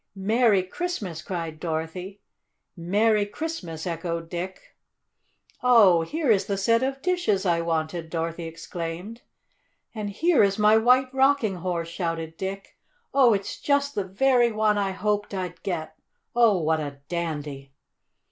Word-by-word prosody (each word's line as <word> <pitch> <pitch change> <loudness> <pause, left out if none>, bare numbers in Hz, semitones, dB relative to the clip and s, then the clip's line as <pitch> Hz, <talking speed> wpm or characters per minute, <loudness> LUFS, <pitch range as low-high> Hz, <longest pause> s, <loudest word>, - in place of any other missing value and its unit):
"Merry 210 0 +3
Christmas!" 190 - -4
cried 165 -4 -5
Dorothy. 175 +4 -4 0.5
"Merry 205 +5 +2
Christmas!" 205 - -5
echoed 165 -1 -3
Dick. 180 +2 -6 0.9
"Oh, 215 -9 +6
here 295 - 0
is 195 -3 +3
the 200 - -1
set 230 +4 +2
of 270 +1 -2
dishes 350 - +1
I 170 -2 +2
wanted!" 165 0 -2
Dorothy 165 0 -3
exclaimed. 165 +6 -6 0.7
"And 215 -3 -4
here 325 - +3
is 195 -1 +3
my 210 0 +5
White 250 +3 +4
Rocking 265 -7 +2
Horse!" 170 -1 -3
shouted 165 -2 -3
Dick. 195 +2 -6 0.3
"Oh, 260 -4 +6
it's 195 0 -5
just 280 0 +1
the 200 - -1
very 240 +5 +3
one 215 -1 +2
I 200 -1 0
hoped 205 +1 -2
I'd 180 -2 -5
get! 165 -4 -4 0.4
Oh, 230 -6 +4
what 160 0 +1
a 140 -2 -6
dandy!" 150 -5 -4
190 Hz, 140 wpm, -25 LUFS, 165-225 Hz, 0.9 s, Oh